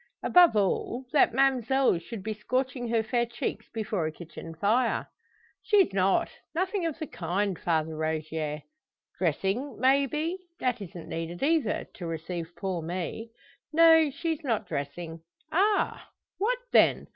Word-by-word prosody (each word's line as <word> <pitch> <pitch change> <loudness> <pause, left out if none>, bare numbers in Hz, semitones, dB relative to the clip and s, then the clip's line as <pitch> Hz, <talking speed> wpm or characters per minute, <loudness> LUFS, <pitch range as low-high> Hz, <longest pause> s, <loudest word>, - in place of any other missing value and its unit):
Above 350 -7 +6
all, 215 +5 0
that 295 - +5
ma'mselle 265 -3 +3
should 200 +3 -8
be 220 +1 -2
scorching 250 +3 -2
her 225 -1 +2
fair 235 +2 +1
cheeks 240 0 -4
before 210 -7 -2
a - - -3
kitchen 165 0 -10
fire." 225 +8 +1 0.6
"She's 395 - +3
not 195 0 +3 0.3
nothing 375 0 0
of 320 - -4
the 320 - -4
kind, 185 - -2
Father 160 -2 0
Rogier." 155 -1 -3 0.6
"Dressing, 195 - -1
may 270 +3 +4
be? 320 +6 -2 0.2
That 250 -3 0
isn't 175 -3 -8
needed 165 +4 -4
either 315 +1 +1
to 180 -6 -7
receive 165 +1 -5
poor 180 -1 -3
me." 180 +7 -4 0.4
"No; 325 -1 +6
she's 315 +3 -3
not 235 -6 0
dressing." 160 +4 -5 0.3
"Ah! 400 +4 +1 0.3
What 475 +5 +1
then? - - +5
220 Hz, 140 wpm, -28 LUFS, 170-275 Hz, 0.6 s, Above